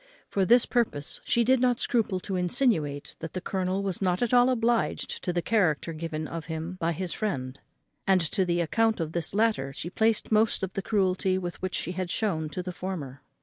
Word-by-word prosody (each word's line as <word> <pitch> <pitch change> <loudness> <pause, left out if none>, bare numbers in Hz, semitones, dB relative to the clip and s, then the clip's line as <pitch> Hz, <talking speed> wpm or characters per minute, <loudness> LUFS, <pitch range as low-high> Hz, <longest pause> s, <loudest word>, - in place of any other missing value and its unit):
For 195 -2 +1
this 240 +4 +5
purpose 220 - -1
she 235 - +3
did 260 +2 +4
not 245 -1 +2
scruple 210 -6 +1
to 195 - -3
insinuate 175 - 0
that 165 -1 -6
the 185 - -2
colonel 190 +1 -1
was 195 -2 -2
not 180 +2 +1
at 240 - 0
all 245 +1 +6
obliged 235 -2 0
to 180 - 0
the 175 -1 -1
character 175 -7 +1
given 155 -1 -4
of 165 +1 -6
him 160 +2 -4
by 165 +1 +1
his 180 +2 -4
friend, 135 -11 -3 0.5
and 190 -1 +5
to 170 +3 0
the 175 -1 +1
account 225 +7 +1
of 160 -2 -2
this 170 +2 -3
latter 210 -11 +1
she 170 +5 -5
placed 220 +2 +1
most 215 -1 +3
of 190 - -3
the 195 - -2
cruelty 190 -2 +1
which 185 0 -4
she - - -2
had 185 0 -3
shewn 165 -7 -1
to 180 +4 -4
the 180 - -4
former. 165 -8 -5
185 Hz, 205 wpm, -27 LUFS, 165-215 Hz, 0.5 s, all